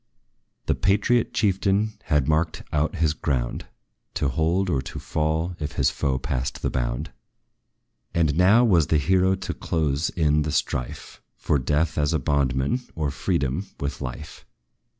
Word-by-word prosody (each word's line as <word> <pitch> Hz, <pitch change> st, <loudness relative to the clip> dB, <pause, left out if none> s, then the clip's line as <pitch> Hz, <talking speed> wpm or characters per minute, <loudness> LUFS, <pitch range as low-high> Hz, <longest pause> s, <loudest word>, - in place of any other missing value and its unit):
The -, -, +2 dB
patriot 105 Hz, +4 st, +2 dB
chieftain 100 Hz, +1 st, +1 dB
had 75 Hz, -4 st, +2 dB
marked 80 Hz, +1 st, 0 dB
out 75 Hz, +4 st, +1 dB
his 80 Hz, -3 st, +1 dB
ground, 65 Hz, -6 st, -2 dB, 0.5 s
To 70 Hz, -, +1 dB
hold, 80 Hz, +7 st, +1 dB
or 70 Hz, -7 st, +1 dB
to 65 Hz, -, -8 dB
fall, 80 Hz, +3 st, -1 dB
if 75 Hz, -1 st, -4 dB
his 70 Hz, -1 st, +2 dB
foe 65 Hz, -2 st, -1 dB
passed 65 Hz, +1 st, -3 dB
the -, -, 0 dB
bound: 60 Hz, +4 st, -2 dB, 1.0 s
And 80 Hz, -4 st, +1 dB
now 100 Hz, +8 st, +5 dB
was 85 Hz, -9 st, +4 dB
the 80 Hz, -, +3 dB
hero 95 Hz, +5 st, +3 dB
to 95 Hz, -, -5 dB
close 75 Hz, -1 st, -1 dB
in 75 Hz, -3 st, +2 dB
the 75 Hz, 0 st, -2 dB
strife, 60 Hz, -3 st, -3 dB
For 75 Hz, -, 0 dB
death 75 Hz, +4 st, 0 dB
as 75 Hz, +1 st, +1 dB
a 80 Hz, -, +2 dB
bondman, 70 Hz, -, 0 dB
or 75 Hz, -3 st, -1 dB
freedom 70 Hz, +7 st, -1 dB
with 70 Hz, 0 st, -4 dB
life. 65 Hz, +4 st, -7 dB
75 Hz, 150 wpm, -24 LUFS, 70-90 Hz, 1.0 s, now